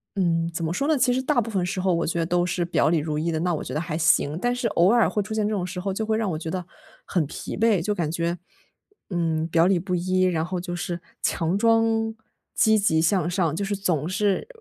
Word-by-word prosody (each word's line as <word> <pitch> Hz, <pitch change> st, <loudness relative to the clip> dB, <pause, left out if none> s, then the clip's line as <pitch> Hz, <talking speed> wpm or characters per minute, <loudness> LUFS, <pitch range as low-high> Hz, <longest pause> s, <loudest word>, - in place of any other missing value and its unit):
嗯， 165 Hz, -3 st, +1 dB
怎 165 Hz, -, -3 dB
么 160 Hz, -, -1 dB
说 275 Hz, -, -1 dB
呢？ 315 Hz, -, +3 dB
其 250 Hz, -, +3 dB
实 260 Hz, -, +1 dB
大 260 Hz, -2 st, +1 dB
部 225 Hz, -, -5 dB
分 190 Hz, -4 st, -1 dB
时 185 Hz, +1 st, -2 dB
候 190 Hz, -1 st, +1 dB
我 170 Hz, -1 st, +1 dB
觉 170 Hz, +1 st, -2 dB
得 165 Hz, -, +1 dB
都 175 Hz, 0 st, +1 dB
是 175 Hz, 0 st, -1 dB
表 155 Hz, -3 st, +2 dB
里 165 Hz, -2 st, +2 dB
如 150 Hz, 0 st, -3 dB
一 165 Hz, +2 st, -1 dB
的， 160 Hz, -, -1 dB
那 175 Hz, -1 st, 0 dB
我 -, -, -4 dB
觉 -, -, -6 dB
得 155 Hz, -, -1 dB
还 160 Hz, -2 st, -3 dB
行。 155 Hz, -1 st, +2 dB
但 245 Hz, +3 st, 0 dB
是 245 Hz, -1 st, -1 dB
偶 185 Hz, 0 st, +3 dB
尔 235 Hz, -2 st, +4 dB
会 210 Hz, -, -1 dB
出 220 Hz, -, -6 dB
现 215 Hz, -1 st, 0 dB
这 215 Hz, -, -1 dB
种 180 Hz, -2 st, -2 dB
时 180 Hz, 0 st, -5 dB
候， 195 Hz, +1 st, -2 dB
就 220 Hz, +3 st, -2 dB
会 220 Hz, 0 st, 0 dB
让 220 Hz, -3 st, 0 dB
我 155 Hz, -, -2 dB
觉 160 Hz, 0 st, -5 dB
得 185 Hz, -1 st, -3 dB, 0.4 s
很 170 Hz, -4 st, 0 dB
疲 140 Hz, -, -7 dB
惫 220 Hz, -5 st, +3 dB
就 210 Hz, +4 st, -1 dB
感 160 Hz, -4 st, -1 dB
觉， 170 Hz, +1 st, -1 dB, 0.7 s
嗯， 165 Hz, -3 st, -1 dB
表 165 Hz, 0 st, +3 dB
里 185 Hz, -2 st, +3 dB
不 180 Hz, +1 st, -2 dB
一， 185 Hz, +1 st, 0 dB
然 165 Hz, -3 st, +1 dB
后 180 Hz, 0 st, -3 dB
就 175 Hz, 0 st, -5 dB
是 175 Hz, -1 st, -4 dB, 0.2 s
强 170 Hz, +3 st, 0 dB
装 225 Hz, 0 st, +2 dB, 0.4 s
积 220 Hz, 0 st, +4 dB
极 160 Hz, -6 st, +2 dB
向 170 Hz, 0 st, +2 dB
上， 175 Hz, -4 st, 0 dB
就 200 Hz, -, -2 dB
是 205 Hz, -, -1 dB
总 175 Hz, -6 st, -1 dB
是 200 Hz, -, 0 dB
180 Hz, 285 characters per minute, -24 LUFS, 165-210 Hz, 0.7 s, 尔